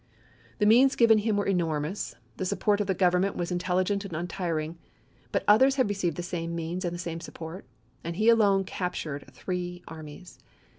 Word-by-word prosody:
The 210 - +2
means 250 +5 +6
given 225 -2 +5
him 210 -1 0
were 205 - 0
enormous, 165 - -1 0.2
the 185 - -2
support 205 +2 +1
of 205 - -2
the 190 - +1
Gov 180 0 +4
ernment 185 +2 +1
was 175 0 -3
intelligent 185 +3 0
and 190 -5 -6
untiring; 165 -1 -3 0.5
but - - 0
others 260 +6 +6
had 260 -4 +2
received 185 -6 -1
the 175 - -3
same 170 -1 -4
means 170 +3 -3
and 175 -1 -2
the - - -5
same 170 -1 -4
support. 165 +2 -8 0.2
— 125 +2 -36
and 170 +1 -4
he 215 +5 +1
alone 205 -4 +5
captured 170 -6 -4
three 180 -1 -5
armies. 160 +3 -10
180 Hz, 190 wpm, -28 LUFS, 170-205 Hz, 0.5 s, means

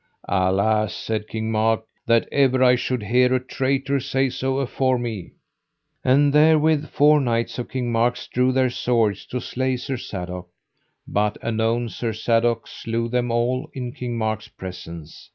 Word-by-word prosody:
Alas, 100 +3 +1
said 110 -1 -3
King 110 0 -3
Mark, 110 0 +1 0.2
that 115 -1 +3
ever 130 -2 +3
I 125 -1 +6
should 125 -2 -2
hear 125 +4 +3
a - - +2
traitor 135 +2 -1
say 135 +1 0
so 130 0 -2
afore 130 -1 +1
me. 115 -7 -5 0.7
And 140 +2 +4
therewith 155 0 +4
four 150 0 +4
knights 115 -1 -1
of 120 - -5
King 125 -2 -2
Mark's 120 +2 +1
drew 125 +1 +1
their 130 -1 +2
swords 115 -5 0
to 125 - -3
slay 130 +1 -2
Sir 130 +1 -4
Sadok, 90 -4 -6 0.6
but 105 +1 0
anon 115 +1 0
Sir 115 0 -3
Sadok 115 +1 +1
slew 115 +1 -3
them 125 0 0
all 125 +5 0
in 125 -2 -4
King 120 -1 -5
Mark's 110 -1 -2
presence. 90 -6 -10
120 Hz, 155 wpm, -22 LUFS, 110-130 Hz, 0.7 s, I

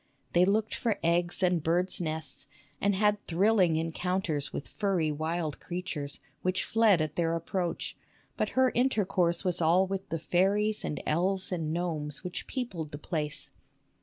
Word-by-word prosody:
They 175 +1 +6
looked 210 +3 +1
for 225 -3 0
eggs 175 +3 +2
and 180 -2 +3
birds' 175 +4 +1
nests, 160 -3 -5 0.3
and 200 0 +2
had 210 +1 +2
thrilling 185 -1 +3
encounters 165 -1 -1
with - - -5
furry 185 -7 0
wild 155 0 -2
creatures, 170 -5 -4 0.2
which 185 +1 0
fled 215 -7 +4
at 155 -1 -5
their 165 -1 +1
approach; 170 +1 -2 0.4
but - - 0
her 260 0 +6
inter 245 -5 +2
course 170 -1 +1
was 180 -1 0
all 170 +4 +4
with 195 +1 -4
the 165 - -1
fairies 195 +6 +1
and - - -3
elves 185 +5 0
and 165 -4 -1
gnomes 160 -3 -3
which 180 -1 -5
peopled 185 - -4
the - - -4
place. 150 -1 -4
175 Hz, 160 wpm, -29 LUFS, 160-195 Hz, 0.4 s, They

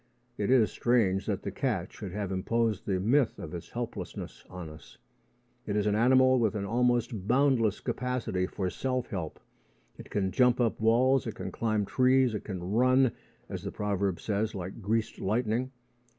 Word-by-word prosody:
It 105 -1 -2
is 125 -4 +4
strange 105 -6 +1
that 100 -4 -2
the 100 - -3
cat 105 -6 -2
should 100 -4 -7
have 100 0 -3
imposed 110 +2 0
the 95 -2 +1
myth 120 +5 +2
of 80 - -8
its 85 - -7
helplessness - - -6
on 90 -2 -7
us. 80 0 -13 0.7
It 105 - -1
is 105 -1 +1
an 105 - +2
animal 130 +3 +5
with 110 -2 +1
an 100 -1 -2
almost 120 -2 0
boundless 125 -5 +3
capacity 125 -8 -2
for 95 -2 -3
self 130 -2 -2
help. 85 -5 -4 0.6
It - - -10
can 95 -2 -1
jump 125 +1 +3
up 120 -2 +1
walls. 125 +4 +3
It - - -4
can - - -5
climb 110 -3 0
trees. 130 +1 +3
It 105 - -4
can 95 -4 -5
run, 130 +2 +4 0.4
as - - -5
the - - -5
proverb 100 -3 -1
says, 105 0 -1
like 95 +4 -6
"greased 110 +2 -1
lightning." 115 +5 0
110 Hz, 175 wpm, -29 LUFS, 100-125 Hz, 0.7 s, animal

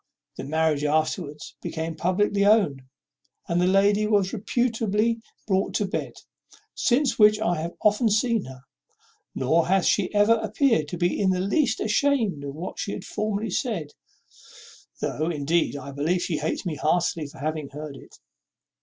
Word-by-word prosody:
The - - -6
marriage 155 0 +1
afterwards 150 0 -1
became 160 0 -4
publicly 200 +5 +1
owned, 200 -10 +3 0.7
and 170 +1 +1
the 180 - +3
lady 200 +2 +3
was 200 -3 +1
reputably 225 0 0 0.2
brought 195 -2 0
to 205 - +1
bed. 190 - -4 0.6
Since 255 -1 +1
which 210 0 +6
I 175 -7 0
have 170 +2 -4
often 210 +2 +3
seen 220 0 +1
her; 130 -1 -11 0.7
nor 160 +6 +2
hath 190 0 +2
she 195 -3 +2
ever 210 +2 +4
appeared 230 - +1
to 175 - -5
be 175 +1 0
in 195 - +3
the 185 -1 +1
least 220 - +1
ashamed 220 - +1
of 140 0 -6
what 170 +4 -6
she 200 - -3
had 190 - -7
formerly 215 0 -2
said, 175 - -2 1.1
though, 155 +3 -1
indeed, 160 0 0
I 140 0 -7
believe 160 +6 0
she 160 - -1
hates 155 +5 -3
me 160 -4 -3
heartily 165 0 0
for 140 - -14
having 155 0 -3
heard 150 0 -8
it." - - -15
185 Hz, 160 wpm, -25 LUFS, 155-215 Hz, 1.1 s, which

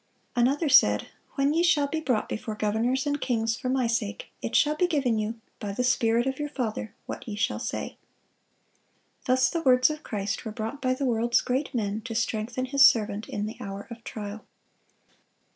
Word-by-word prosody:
Another 270 +6 +2
said, 275 - +5 0.3
"When 275 +1 +2
ye 330 - +2
shall 310 -4 +4
be 315 +3 -2
brought 255 -8 0
before 215 0 -4
governors 225 +6 0
and 290 0 -1
kings 225 -2 0
for 255 - -4
My 260 -1 +1
sake, 230 -3 -2
it - - -3
shall 300 0 +4
be 355 +4 +2
given 270 -9 +1
you, 220 +2 -3 0.2
by 200 -1 -4
the 250 - -1
Spirit 240 -1 +2
of 265 +1 -2
your 295 0 -2
Father, 225 -6 -4
what - - -7
ye 215 - -4
shall 205 - -1
say." - - -4 1.3
Thus 255 0 +4
the 335 - -1
words 255 0 +5
of 305 0 -6
Christ 200 -4 -3
were 220 - -5
brought 225 +6 -5
by 255 -1 +1
the 275 - -2
world's 235 -1 +2
great 265 +2 -2
men 210 -1 -1
to 230 -3 -5
strengthen 230 +2 -1
His 275 +2 +4
servant 215 -4 +4
in 205 - -2
the 220 - -6
hour 200 -3 -6
of 230 0 -9
trial. 210 -1 -6
240 Hz, 195 wpm, -27 LUFS, 220-275 Hz, 1.3 s, said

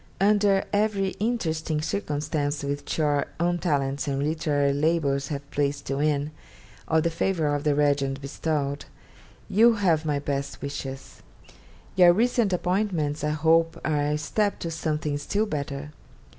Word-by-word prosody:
Under 200 0 +3
every 205 -2 +1
interesting 160 -9 -1
circumstance 150 -3 -2
which 140 0 -3
your 145 -2 +1
own 175 +1 +1
talents 140 -5 -1
and 140 0 -1
literary 145 -2 +1
labours 145 -2 +1
have 140 -1 -5
placed 145 -1 -1
you 135 - -1
in, 150 0 0 0.6
or 160 0 +3
the 170 - 0
favour 165 -3 0
of 145 0 -1
the 150 -2 +2
Regent 140 -2 +1
bestowed, 140 0 -2 0.6
you 230 +4 +5
have 175 -7 +2
my 150 -2 0
best 140 -1 -3
wishes. 135 -1 -7 0.7
Your 175 -2 +7
recent 230 0 +2
appointments 180 -5 0
I 150 - +1
hope 165 +2 +2
are 150 -2 +1
a 150 +1 0
step 200 +8 0
to 165 - -3
something 155 -2 -2
still 205 +8 0
better. 145 -4 -4
150 Hz, 145 wpm, -26 LUFS, 145-175 Hz, 0.7 s, Your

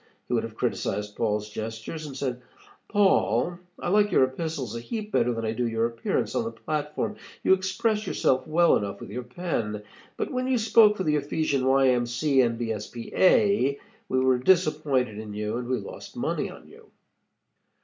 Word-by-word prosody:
He - - -3
would - - +2
have - - -7
criticized 105 0 -2
Paul's 105 -2 -1
gestures, 110 +8 -6
and 135 -2 -8
said, 125 -2 -3 0.5
'Paul, 180 - +2 0.2
I - - -3
like 205 +2 +3
your - - +5
Epistles 130 -3 -3
a - - -3
heap 215 - -5
better 125 -5 +2
than 115 -1 -3
I 110 - 0
do 120 +1 -1
your 115 0 0
appearance 120 - -1
on 240 - 0
the 230 - -4
platform. 150 +6 -3 0.3
You - - +5
express 210 +3 0
yourself 130 -6 +1
well 170 +2 +4
enough 100 -1 -4
with - - -9
your 125 +4 -4
pen, 120 - -3 0.3
but - - -2
when 255 0 -1
you 260 -1 +2
spoke 220 -1 +5
for 190 - -1
the 150 -2 +2
Ephesian 145 -2 0
Y. 135 0 +5
M. 120 -1 +2
C. 135 +3 +2
A., 120 - +1 0.3
we 130 - +2
were 130 -1 +3
disappointed 150 - +2
in 105 -1 -7
you 105 +2 -2
and 120 -1 -4
we 130 0 0
lost - - -9
money - - -1
on - - -13
you.' - - -17
130 Hz, 180 wpm, -26 LUFS, 115-180 Hz, 0.5 s, your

